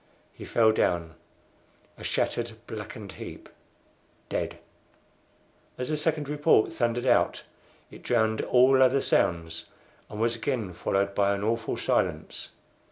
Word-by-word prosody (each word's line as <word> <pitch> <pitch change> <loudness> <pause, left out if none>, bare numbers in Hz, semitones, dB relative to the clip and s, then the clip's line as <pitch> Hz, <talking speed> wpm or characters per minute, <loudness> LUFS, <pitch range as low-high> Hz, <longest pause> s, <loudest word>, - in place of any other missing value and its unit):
He - - -10
fell 110 -1 +4
down 85 -6 0 0.8
a - - -12
shattered, 120 -1 -1
blackened 105 -2 -7
heap, - - -9 0.8
dead. - - -2 1.2
As 125 +2 -3
the 155 - +1
second 150 -1 -1
report 150 -5 +3
thundered 120 +1 0
out 130 - +2 0.5
it - - -12
drowned 110 -2 +1
all 130 +1 +5
other 130 +1 +5
sounds, 85 -1 0 0.4
and 105 - -7
was 115 +1 +1
again 115 -6 -2
followed 100 +3 0
by 100 0 +2
an 100 - -4
awful 115 +1 -1
silence. - - -1
115 Hz, 125 wpm, -27 LUFS, 100-125 Hz, 1.2 s, all